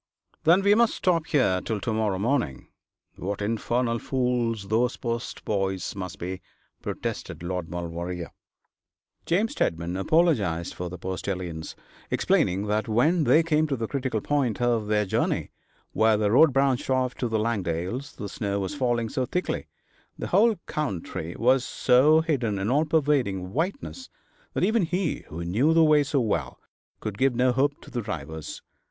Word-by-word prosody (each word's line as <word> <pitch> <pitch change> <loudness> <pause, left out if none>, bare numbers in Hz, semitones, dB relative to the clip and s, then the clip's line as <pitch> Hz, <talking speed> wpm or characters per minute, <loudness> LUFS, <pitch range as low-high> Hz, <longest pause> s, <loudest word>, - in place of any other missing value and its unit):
'Then 175 +4 +5
we 200 +1 +6
must 235 +1 +3
stop 170 -3 +1
here 120 - +2
till 110 -2 -2
to 110 - -2
morrow 110 -3 0
morning. 105 - -1 0.5
What 100 +2 -3
infernal 115 +3 0
fools 120 -6 -1
those 120 +3 +1
post 120 0 -4
boys 95 -2 -1
must 95 -3 -6
be,' 90 +1 -5 0.4
protested - - -5
Lord 90 -1 -3
Maulevrier. 85 0 -5 1.0
James 205 +7 +2
Steadman 85 +2 -1
apologised 100 - +1
for 90 0 -5
the 90 - -7
postilions, 90 -2 -4 0.3
explaining 95 +3 +1
that 105 0 0
when 150 +9 +3
they 160 - +5
came 155 -1 +2
to 140 - -1
the 115 -3 -3
critical 130 -5 -2
point 135 -5 0
of 120 -3 +1
their 105 0 +2
journey, 110 +4 -1 0.4
where 110 -1 +3
the 105 -1 +1
road 155 +6 +6
branched 135 -1 +1
off 130 -1 +1
to 125 - -1
the 110 -1 0
Langdales, 105 - -2
the 105 - -5
snow 100 0 -2
was 95 +5 -3
falling 120 -5 0
so 130 +1 -2
thickly, 180 +6 -2 0.5
the - - -5
whole 225 +2 +4
country 90 - -4
was 125 +2 +3
so 145 +6 +4
hidden 125 -10 0
in 100 +4 -1
all 150 +4 +3
pervading 135 - +1
whiteness, 200 - -3 0.5
that - - 0
even 220 +4 +3
he, 175 -1 -1
who 85 +2 -6
knew 125 - +2
the 165 - +6
way 155 -1 +5
so 140 0 0
well, 85 - -1 0.4
could 105 -2 -5
give 135 -2 +3
no 125 +1 +3
help 140 +3 +1
to - - -13
the 120 - -2
drivers. 80 -5 -6
115 Hz, 160 wpm, -26 LUFS, 95-145 Hz, 1.0 s, we